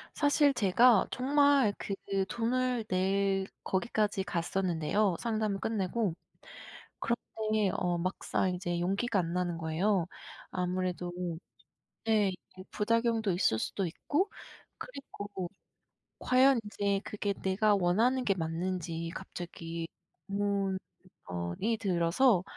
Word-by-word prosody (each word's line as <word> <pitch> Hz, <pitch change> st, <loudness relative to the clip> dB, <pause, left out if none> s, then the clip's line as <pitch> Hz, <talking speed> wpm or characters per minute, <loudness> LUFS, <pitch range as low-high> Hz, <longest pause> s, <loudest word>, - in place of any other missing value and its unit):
사실 290 Hz, -1 st, +4 dB
제가 215 Hz, +1 st, +5 dB
정말 280 Hz, -3 st, +4 dB
그 200 Hz, -, -3 dB, 0.3 s
돈을 245 Hz, 0 st, 0 dB
낼 195 Hz, +1 st, +1 dB, 0.2 s
거기까지 205 Hz, 0 st, 0 dB
갔었는데요, 180 Hz, +1 st, 0 dB
상담을 215 Hz, -4 st, -1 dB
끝내고. 210 Hz, -2 st, 0 dB, 0.9 s
그런데 215 Hz, -3 st, 0 dB
어 175 Hz, -2 st, 0 dB
막상 185 Hz, +1 st, -1 dB
이제 175 Hz, -1 st, -2 dB
용기가 195 Hz, +4 st, +1 dB
안 170 Hz, -1 st, -3 dB
나는 175 Hz, -2 st, -1 dB
거예요. 170 Hz, +3 st, +1 dB, 0.4 s
아무래도 180 Hz, -1 st, -2 dB, 1.0 s
예 215 Hz, -2 st, +4 dB
이제 185 Hz, 0 st, -12 dB
부작용도 230 Hz, -1 st, +1 dB
있을 170 Hz, -, +2 dB
수도 190 Hz, -, -1 dB
있고 295 Hz, -, -1 dB, 0.5 s
그리고 205 Hz, -, -7 dB, 0.7 s
과연 255 Hz, 0 st, +5 dB
이제 200 Hz, -1 st, 0 dB
그게 205 Hz, -1 st, -2 dB
내가 195 Hz, +3 st, +2 dB
원하는 225 Hz, +8 st, +2 dB
게 200 Hz, -, +3 dB
맞는지 165 Hz, -1 st, -3 dB
갑자기 170 Hz, -3 st, -6 dB, 0.4 s
의문 200 Hz, -1 st, 0 dB, 0.5 s
어 85 Hz, -1 st, -3 dB
이 225 Hz, +2 st, +1 dB
들어서 190 Hz, +2 st, +3 dB
195 Hz, 230 characters per minute, -31 LUFS, 180-225 Hz, 1.0 s, 제가